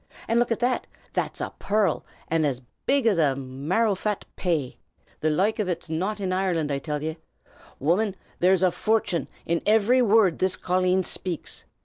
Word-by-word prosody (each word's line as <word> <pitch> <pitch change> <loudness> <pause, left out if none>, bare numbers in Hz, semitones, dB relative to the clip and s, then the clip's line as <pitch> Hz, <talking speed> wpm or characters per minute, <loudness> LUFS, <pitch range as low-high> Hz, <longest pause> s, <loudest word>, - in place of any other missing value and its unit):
And 230 - +3
look 240 - +2
a' 230 - +2
that! 245 +2 0 0.3
That's - - -2
a - - -4
pearrl, 205 -5 +1 0.2
an' 165 0 +1
as 135 -4 -1 0.2
big 275 -2 +3
as 205 -6 +3
a 140 -4 +3
marrowfat 185 - -1
pay. 160 -8 -1 0.4
The 155 - +1
loike 195 +9 +1
of 205 -3 0
ut's 170 -2 -3
not 190 +7 -1
in 190 -2 -1
Ireland, 175 -5 0
I 140 - 0
till 150 0 -4
ye. 160 +1 -3 0.6
Woman, 185 +7 +1 0.2
there's 185 +1 +4
a 185 - +4
fortin' 215 -4 0 0.2
in 170 0 0
ivery 220 +4 +4
wurrd 215 -6 +4
this 185 0 +2
colleen 185 +1 +1
shpakes! 180 -2 -3
185 Hz, 170 wpm, -25 LUFS, 160-215 Hz, 0.6 s, there's